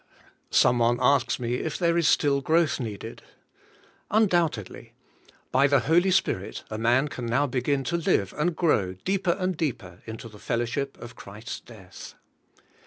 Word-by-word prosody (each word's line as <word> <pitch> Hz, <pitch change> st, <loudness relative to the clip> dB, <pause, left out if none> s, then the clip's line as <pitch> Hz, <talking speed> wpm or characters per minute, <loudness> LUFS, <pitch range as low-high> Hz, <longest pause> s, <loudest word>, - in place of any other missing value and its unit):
Some 120 Hz, -, +4 dB
one 120 Hz, +1 st, +3 dB
asks 140 Hz, -1 st, +2 dB
me 120 Hz, 0 st, -1 dB
if 155 Hz, -, -3 dB
there 170 Hz, -2 st, +1 dB
is 170 Hz, -3 st, +2 dB
still 140 Hz, -2 st, +3 dB
growth 160 Hz, +1 st, +2 dB
needed. 110 Hz, -5 st, -6 dB, 0.9 s
Undoubtedly. 175 Hz, -, 0 dB, 0.6 s
By 135 Hz, +2 st, +4 dB
the 140 Hz, -2 st, +3 dB
Holy 170 Hz, +9 st, +3 dB
Spirit 100 Hz, -, 0 dB
a 110 Hz, -, -4 dB
man 120 Hz, +5 st, +3 dB
can 125 Hz, -4 st, -6 dB
now 130 Hz, +5 st, +2 dB
begin 135 Hz, +1 st, -1 dB
to 170 Hz, +5 st, -1 dB
live 100 Hz, -, 0 dB
and 165 Hz, +3 st, 0 dB
grow, 105 Hz, -, +1 dB
deeper 180 Hz, -, -1 dB
and 185 Hz, -1 st, -1 dB
deeper, 115 Hz, -, -4 dB
into 110 Hz, +1 st, -7 dB
the 105 Hz, -2 st, -14 dB
fellowship 120 Hz, +5 st, -2 dB
of 120 Hz, -, -10 dB
Christ's 105 Hz, +3 st, -8 dB
death. 100 Hz, -6 st, -13 dB
135 Hz, 155 wpm, -26 LUFS, 115-165 Hz, 0.9 s, Some